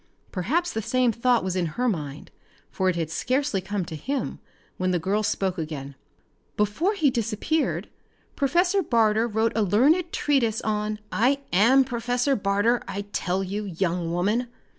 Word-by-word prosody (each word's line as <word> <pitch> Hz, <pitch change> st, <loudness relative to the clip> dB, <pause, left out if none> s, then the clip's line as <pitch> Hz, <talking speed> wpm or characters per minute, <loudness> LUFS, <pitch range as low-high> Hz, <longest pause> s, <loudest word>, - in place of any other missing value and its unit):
Perhaps 320 Hz, -, -1 dB
the 220 Hz, -, -1 dB
same 250 Hz, +2 st, +2 dB
thought 235 Hz, 0 st, +2 dB
was 185 Hz, -1 st, -2 dB
in 180 Hz, -2 st, 0 dB
her 250 Hz, +1 st, +1 dB
mind, 150 Hz, -, -4 dB, 0.4 s
for 190 Hz, 0 st, +1 dB
it 180 Hz, -, 0 dB
had 165 Hz, -2 st, -2 dB
scarcely 255 Hz, -, 0 dB
come 190 Hz, -1 st, -3 dB
to 160 Hz, -, -7 dB
him 265 Hz, -, -3 dB, 0.4 s
when 185 Hz, 0 st, 0 dB
the 180 Hz, -, +2 dB
girl 195 Hz, +6 st, 0 dB
spoke 190 Hz, -3 st, -1 dB
again. 145 Hz, -3 st, -5 dB, 0.6 s
"Before 260 Hz, -, +1 dB
he 300 Hz, -8 st, +3 dB
disappeared 235 Hz, +6 st, -1 dB, 0.5 s
Professor 355 Hz, +7 st, +2 dB
Barter 225 Hz, -, +2 dB
wrote 220 Hz, 0 st, +1 dB
a 225 Hz, -, +2 dB
learned 285 Hz, -, +3 dB
treatise 245 Hz, -7 st, +1 dB
on 210 Hz, 0 st, -1 dB
" -, -, -36 dB, 0.2 s
"I 280 Hz, +1 st, +1 dB
am 240 Hz, +9 st, +6 dB
Professor 245 Hz, +2 st, 0 dB
Barter, 205 Hz, +4 st, +1 dB
I 200 Hz, -, -3 dB
tell 185 Hz, +2 st, -1 dB
you, 205 Hz, +3 st, -4 dB
young 175 Hz, -2 st, -1 dB
woman. 205 Hz, +8 st, 0 dB
215 Hz, 160 wpm, -25 LUFS, 185-255 Hz, 0.6 s, am